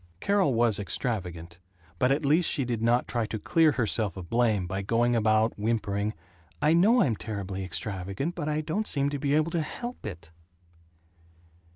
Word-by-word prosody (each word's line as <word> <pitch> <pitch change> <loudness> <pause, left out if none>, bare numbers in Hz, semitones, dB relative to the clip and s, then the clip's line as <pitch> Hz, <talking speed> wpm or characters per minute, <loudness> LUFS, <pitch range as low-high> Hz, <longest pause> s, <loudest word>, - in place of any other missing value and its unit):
II - - -38
Carol 200 - +2
was 115 -3 +2
extravagant, 90 -5 -3 0.4
but 125 - +3
at 145 +2 +1
least 155 +4 +3
she 135 - 0
did 120 -2 -2
not 120 +2 +2
try 120 -3 -1
to 110 - -4
clear 160 +7 +3
herself 110 -5 -1
of 90 -2 -9
blame 115 -5 +2
by 95 +2 -3
going 120 +4 +1
about 110 0 +2
whimpering, 105 -1 -1 0.4
"I 150 +2 +3
know 215 +9 +5
I'm 120 -5 +1
terribly 100 -3 -5
extravagant 95 - -3
but 150 - -3
I 150 0 0
don't 180 +8 -2
seem 140 0 +1
to 145 - -3
be 140 +1 +1
able 155 +2 +1
to 170 -2 0
help 240 +10 -6
it." 85 -4 -9
115 Hz, 180 wpm, -27 LUFS, 100-150 Hz, 0.4 s, know